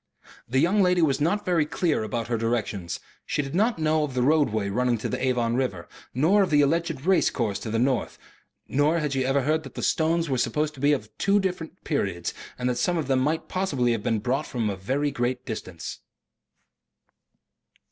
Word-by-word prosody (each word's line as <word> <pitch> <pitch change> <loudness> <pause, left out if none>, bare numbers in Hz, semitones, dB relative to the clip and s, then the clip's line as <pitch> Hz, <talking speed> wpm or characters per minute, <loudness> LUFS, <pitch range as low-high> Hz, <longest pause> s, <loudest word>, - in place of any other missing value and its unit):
The 130 - 0
young 175 +9 +3
lady 180 -2 +3
was 140 -2 +2
not 175 +7 +1
very 175 -4 +3
clear 155 0 0
about 115 +1 -3
her 120 - 0
directions. 110 -6 -2 0.2
She 145 - -1
did 135 - -7
not 215 +5 +2
know 155 -1 +2
of 140 -4 -4
the 125 - +2
roadway 130 -8 +2
running 125 +4 +1
to 110 - -3
the - - -3
Avon 120 -3 +1
river, 125 -10 -2 0.2
nor 165 +11 +3
of 190 - +2
the 150 -1 +4
alleged 165 -1 0
race 190 0 +4
course 110 -6 -2
to 110 - -6
the 115 - 0
north, 125 0 0 0.5
nor 145 +5 +2
had 150 -3 -1
she 135 -1 +1
ever 135 +1 +1
heard 155 +3 +1
that 135 - -12
the - - -4
stones 165 +1 +1
were 130 -3 0
supposed 150 +6 0
to 140 - -13
be 145 +2 +4
of 140 - -4
two 200 +1 +3
different 180 -2 -4
periods 100 - -2 0.2
and 125 - -2
that 125 -1 0
some 175 -1 +1
of 160 - -1
them 135 -1 +2
might 155 +5 0
possibly 145 -11 0
have 115 -2 -1
been 110 +1 0
brought 130 +8 -1
from 115 -4 -1
a - - -4
very 135 +10 -1
great 125 0 -2
distance. 95 -7 -6
135 Hz, 210 wpm, -25 LUFS, 120-160 Hz, 0.5 s, the